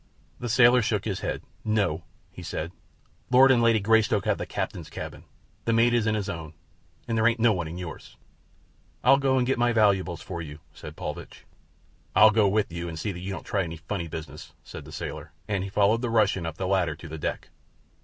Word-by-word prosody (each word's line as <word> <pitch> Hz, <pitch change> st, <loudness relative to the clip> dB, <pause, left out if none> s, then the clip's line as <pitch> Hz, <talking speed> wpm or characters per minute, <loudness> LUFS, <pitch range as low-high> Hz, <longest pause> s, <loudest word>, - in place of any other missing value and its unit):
The 120 Hz, -, -4 dB
sailor 120 Hz, +2 st, +6 dB
shook 105 Hz, -3 st, -1 dB
his 100 Hz, -4 st, -2 dB
head. -, -, -3 dB, 0.2 s
"No," 105 Hz, -7 st, 0 dB, 0.3 s
he -, -, -11 dB
said; 80 Hz, +2 st, -4 dB, 0.6 s
"Lord 130 Hz, +2 st, +7 dB
and 120 Hz, -2 st, +4 dB
Lady 115 Hz, -1 st, +4 dB
Greystoke 110 Hz, -1 st, +2 dB
have -, -, +1 dB
the -, -, -4 dB
captain's -, -, -4 dB
cabin. -, -, -8 dB, 0.4 s
The 115 Hz, -, +2 dB
mate 115 Hz, +1 st, +4 dB
is 115 Hz, -2 st, +2 dB
in 110 Hz, -, +2 dB
his 105 Hz, -2 st, -2 dB
own, 80 Hz, -5 st, -6 dB, 0.5 s
and 115 Hz, -, -1 dB
there 110 Hz, 0 st, +4 dB
ain't 120 Hz, 0 st, +1 dB
no 115 Hz, -1 st, +4 dB
one 85 Hz, -4 st, -3 dB
in 85 Hz, +2 st, -7 dB
yours." 90 Hz, -3 st, -8 dB, 0.9 s
"I'll 135 Hz, -, +6 dB
go 135 Hz, -1 st, +2 dB
and 125 Hz, -, +2 dB
get 130 Hz, -1 st, 0 dB
my 120 Hz, 0 st, +3 dB
valuables 95 Hz, -5 st, +2 dB
for 85 Hz, -3 st, -5 dB
you," 75 Hz, -2 st, -8 dB, 0.2 s
said -, -, -10 dB
Paulvitch. -, -, -7 dB, 0.7 s
"I'll 110 Hz, 0 st, +8 dB
go 105 Hz, -2 st, +3 dB
with 105 Hz, -1 st, +1 dB
you 85 Hz, 0 st, -4 dB
to 80 Hz, -, -7 dB
see 100 Hz, +6 st, -2 dB
that 90 Hz, -, -7 dB
you 95 Hz, +2 st, -5 dB
don't 95 Hz, -, -6 dB
try 100 Hz, -, 0 dB
any 85 Hz, -2 st, -5 dB
funny 85 Hz, +1 st, -4 dB
business," 80 Hz, 0 st, -8 dB
said -, -, -10 dB
the -, -, -11 dB
sailor, -, -, -6 dB
and 100 Hz, -3 st, -1 dB
he 100 Hz, -, -5 dB
followed 105 Hz, +3 st, +2 dB
the 120 Hz, -, -1 dB
Russian 100 Hz, -6 st, +2 dB
up 80 Hz, -1 st, -6 dB
the 95 Hz, -, -2 dB
ladder 90 Hz, -5 st, +1 dB
to 85 Hz, +1 st, -11 dB
the 80 Hz, 0 st, -7 dB
deck. -, -, -4 dB
100 Hz, 220 wpm, -26 LUFS, 85-115 Hz, 0.9 s, I'll